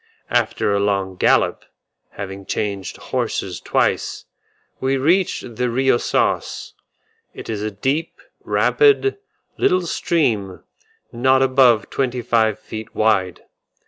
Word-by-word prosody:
After 100 - +1
a 100 - +1
long 100 -2 0
gallop, - - +2 0.5
having 95 -1 -7
changed 100 -3 -3
horses - - -3
twice, - - -1 0.5
we 135 +1 0
reached 150 - 0
the 125 0 0
Rio 130 +1 +2
Sauce: - - -1 0.6
it - - -9
is 105 -2 -3
a 105 - -2
deep, 135 +11 -2 0.2
rapid, 420 -2 +3 0.4
little 185 -1 +2
stream, 115 - -1 0.5
not 130 +2 +3
above 130 -5 +4
twenty 125 -2 -1
five 110 -2 +2
feet 110 0 -9
wide. 100 -5 +1
120 Hz, 110 wpm, -20 LUFS, 100-135 Hz, 0.6 s, above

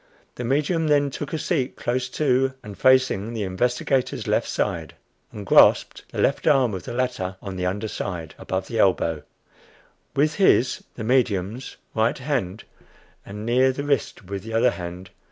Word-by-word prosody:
The - - -6
medium 150 +6 +1
then 145 -2 +3
took 145 - -6
a 160 - -1
seat 150 -5 -1
close 125 +1 -2
to, 135 -2 +1
and 105 -1 -9
facing 130 -4 +3
the 110 - -2
investigator's 125 +6 0
left - - +1
side, - - -2 0.4
and 105 -1 -8
grasped - - +4
the - - -8
left - - +1
arm 125 -5 +4
of 95 -2 -6
the - - -5
latter 120 -7 -2
on 95 -2 -7
the 90 0 -1
under 105 +4 -2
side, 85 -6 -5
above 95 0 -3
the 115 - -3
elbow, 85 -5 +2 0.9
with 150 +2 +2
his 185 -10 +3
(the 110 - -6
medium's) 110 -1 0 0.2
right 110 +1 +1
hand 125 -8 -2 0.6
and 105 +2 -7
near 130 +3 +3
the 140 +2 -5
wrist 140 -7 -1
with 100 +1 -5
the 110 +3 -8
other 115 +2 +4
hand. 90 0 -8
120 Hz, 170 wpm, -24 LUFS, 95-130 Hz, 0.9 s, grasped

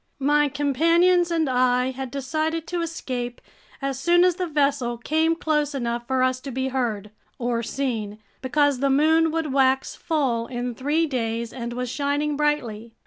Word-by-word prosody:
My 290 +1 +2
companions 335 +6 +3
and 325 -3 +1
I 250 0 +2
had 265 0 -6
decided 310 +4 -2
to 350 0 -3
escape 250 -7 -4 0.4
as 275 -1 -2
soon 345 +5 +4
as 360 -1 +2
the 365 - -2
vessel 280 -5 0
came 315 +6 +1
close 300 -3 0
enough 240 -2 -3
for 260 -1 +1
us 255 0 +1
to 275 - -8
be 260 +1 -2
heard—or 235 0 -3
seen, 230 -4 -3 0.2
because 285 0 +2
the 275 +1 +1
moon 320 +4 +4
would 315 -3 -2
wax 265 -1 +2
full 260 -8 -1
in 245 -1 -4
three 295 +7 0
days 230 -4 -3
and 235 -2 -5
was 250 +1 -3
shining 285 +3 -1
brightly. 235 -7 -1
270 Hz, 160 wpm, -24 LUFS, 245-305 Hz, 0.4 s, soon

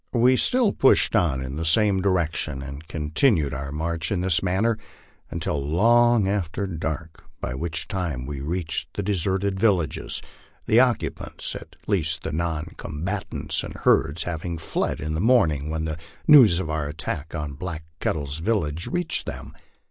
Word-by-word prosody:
We 125 +1 +5
still 245 - +2
pushed 135 - +4
on 80 -11 +2
in 65 +2 -5
the 80 - -2
same 95 +4 +3
direction, 80 -7 0
and 70 +3 -8
continued 80 - +1
our 70 +1 -4
march 80 +1 -2
in 95 -3 0
this 90 -3 +2
manner 105 +5 +1 0.5
until 70 -2 -2
long 115 +7 +4
after 100 -1 -1
dark, 80 -2 -5
by - - -3
which 80 +4 -3
time 85 -10 -2
we 70 0 -5
reached 85 +2 -3
the 100 - -2
deserted 95 0 +1
villages, 95 -8 +1 0.5
the 110 - +5
occupants 125 -3 0
at 80 0 -10
least 80 -5 0
the 80 - -3
non 80 0 -2
combatants 90 +6 -3
and - - -7
herds 80 +4 +2
having 85 0 -4
fled 80 - -2
in 75 0 -3
the 80 - -1
morning 80 - +3
when 80 0 -2 0.3
news 125 - +8
of 95 - -3
our 80 -2 -2
attack 75 +2 -4
on 75 -3 -4
Black 80 +1 -5 0.2
Ket - - +1
tle's 70 -1 -4
village 85 -5 -1
reached 175 -2 -2
them. - - -7
85 Hz, 160 wpm, -24 LUFS, 75-100 Hz, 0.5 s, news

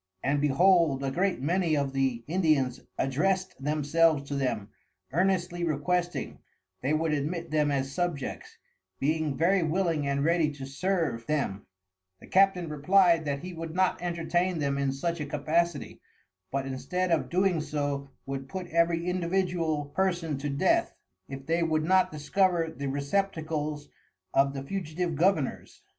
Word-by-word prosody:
And 140 +1 +1
behold 150 -1 +4
a 135 - -1
great 185 -1 0
many 170 0 +1
of 140 -1 -1
the 130 -3 0
Indians 155 -7 +1 0.2
addrest 185 +8 0
themselves 150 +1 +2
to - - -3
them, 120 -7 -1 0.4
earnestly 175 0 +1
requesting, 175 +3 -1 0.4
they 135 - 0
would 155 0 +1
admit 155 +3 -2
them 150 -1 +2
as 135 -1 -1
Subjects, 175 -6 -3 0.4
being 155 0 0
very 185 +3 +3
willing 165 -3 0
and 140 0 0
ready 165 -2 +3
to 135 -2 -7
serve 140 -5 -1
them: 135 -11 -2 0.5
The - - -13
Captain 190 -2 +3
replyed 165 +2 +3
that 140 -1 -2
he 180 0 -6
would 165 0 -6
not 185 -1 +1
entertain 175 +1 0
them 140 -2 -1
in 140 -1 +1
such 170 +5 -2
a - - -2
Capacity, 155 +2 -1 0.5
but 135 0 -2
instead 135 +8 -2
of 165 - +2
so - - -14
doing 150 -6 0 0.2
would 135 0 -5
put 185 -1 -5
every 170 0 +2
individual 175 -4 0
Person 175 -3 0
to 145 +1 -3
Death, 140 0 +1 0.3
if 135 0 -7
they 165 +3 +1
would 155 -2 +1
not 185 +2 +3
discover 165 +2 +1
the 140 - -4
Receptacles 150 0 -2 0.5
of 140 +1 +3
the 135 - -4
Fugitive 175 +1 -3
Governours. 160 -3 0
155 Hz, 150 wpm, -28 LUFS, 140-175 Hz, 0.5 s, behold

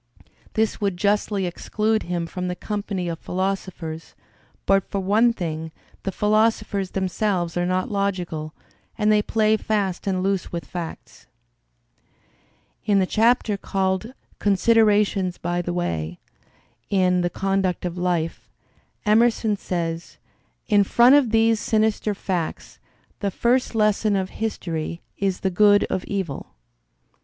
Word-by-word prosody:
This 220 0 0
would 200 -3 0
justly 205 0 +1
exclude 215 +5 -1
him 175 -1 -2
from 180 +2 -4
the 180 - -2
company 200 -3 -3
of 165 -1 -4
philosophers, 185 -4 -4 0.5
but 195 -1 +2
for - - -3
one 210 +5 +3
thing: 160 -6 -4 0.3
the 195 - -3
philosophers 210 -1 +1
themselves 185 -2 -1
are 175 0 0
not 185 +2 -1
logical, 180 -6 -2 0.4
and 215 -1 +3
they 210 0 +4
play 215 0 +2
fast 200 -4 -1
and 185 -1 0
loose 195 -2 -1
with 170 -1 -4
facts. 165 -9 -8 1.6
In 205 -2 +2
the 190 - +3
chapter 225 0 +2
called 195 +5 -2 0.2
"Considerations 205 -2 +3
by 175 0 -1
the 175 - -3
Way" 85 - -2 0.7
in 185 -2 +3
"The 175 - 0
Conduct 195 -1 -1
of 175 -1 -3
Life," 175 -2 -2 0.6
Emerson 220 0 +3
says: 170 -3 -4 0.5
"In 205 -3 +5
front 240 +6 +5
of 285 -5 +5
these 225 0 +3
sinister 215 -1 +1
facts, 180 -4 -4 0.4
the 200 - 0
first 240 +4 +1
lesson 215 -1 +2
of 190 -1 -1
history 170 -7 -3 0.2
is 195 -2 -1
the 190 - 0
good 205 +2 +5
of 185 - -1
evil." 190 -8 -4
195 Hz, 130 wpm, -23 LUFS, 175-215 Hz, 1.6 s, In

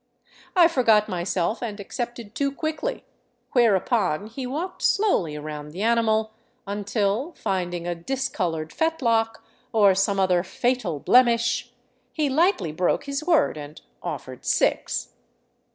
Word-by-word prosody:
I 350 -2 +7
forgot 230 -9 +3
myself 180 +2 -1
and 215 -4 -4
accepted 235 +1 -6
too 280 +2 0
quickly; 315 - -3 0.5
whereupon 205 - +2
he 250 +4 -6
walked 330 +8 -4
slowly 290 - +2
around 150 0 -6
the 190 +5 -4
animal 220 -1 +2 0.3
until, 205 - -1
finding 175 - -2
a 175 - -1
discolored 170 -7 -3
fetlock 230 -9 0 0.3
or 205 -3 +5
some 195 +1 +1
other 185 -2 +3
fatal 210 - -1
blemish, 235 - +3 0.4
he 300 -3 0
lightly 315 - +2
broke 175 +3 0
his 280 +1 -3
word 330 - +2
and 145 0 -9 0.2
offered - - -6
six. - - 0
220 Hz, 120 wpm, -24 LUFS, 180-265 Hz, 0.5 s, I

